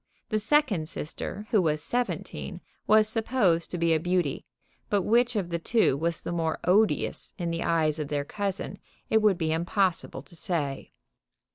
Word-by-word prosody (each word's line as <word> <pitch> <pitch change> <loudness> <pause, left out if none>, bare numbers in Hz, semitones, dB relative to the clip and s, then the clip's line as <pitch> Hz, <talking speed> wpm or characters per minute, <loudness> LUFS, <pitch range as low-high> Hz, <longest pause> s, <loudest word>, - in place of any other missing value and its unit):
The 215 - +1
second 215 - +2
sister, 195 +6 -5
who 215 -5 +4
was 155 -3 +1
seventeen, 245 +10 -3 0.3
was 215 0 +5
supposed 220 -7 +1
to 180 - -4
be 165 -1 +2
a 160 - +2
beauty, 175 -4 -1 0.4
but 200 -2 +2
which 240 +3 +3
of 190 -5 -1
the 170 - -1
two 220 - +2
was 165 +3 -1
the - - -5
more 165 -2 -1
odious 205 +4 +1
in 170 -2 -2
the 165 0 -2
eyes 160 -2 +1
of 150 - -2
their 145 -1 -2
cousin 200 +3 -4 0.3
it 220 - +4
would 210 -4 +4
be 160 -2 -1
impossible 170 - 0
to 160 - -17
say. 150 -6 -3
175 Hz, 170 wpm, -27 LUFS, 160-215 Hz, 0.4 s, was